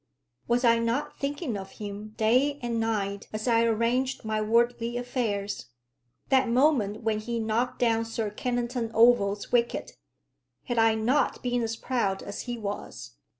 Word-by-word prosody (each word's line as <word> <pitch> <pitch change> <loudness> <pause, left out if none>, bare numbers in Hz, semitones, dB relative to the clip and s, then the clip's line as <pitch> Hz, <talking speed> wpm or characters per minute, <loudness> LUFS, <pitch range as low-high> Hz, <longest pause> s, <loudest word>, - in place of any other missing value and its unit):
Was 240 +1 +2
I 230 -1 +5
not 235 +6 -2
thinking 285 - -2
of 195 -1 -7
him 210 +1 -7
day 255 +6 +3
and 235 -1 -1
night 200 -3 -2
as 215 +2 -4
I 230 -1 +4
arranged 235 +3 0
my 215 0 0
worldly 235 +2 +1
affairs? 220 - -2 0.6
That 265 -2 +3
moment 235 -5 +2
when 220 -1 0
he 235 +2 -3
knocked 225 +3 -1
down 230 -2 +2
Sir 225 -2 -3
Kennington 240 +1 -2
Oval's 215 -3 +4
wicket, 235 -1 +1 0.7
had 240 -2 -1
I 225 0 +4
not 235 +6 +1
been 245 -1 0
as 225 -1 -2
proud 225 -6 -1
as 200 - -6
he 240 - -2
was? 205 - -6
230 Hz, 150 wpm, -27 LUFS, 215-245 Hz, 0.7 s, I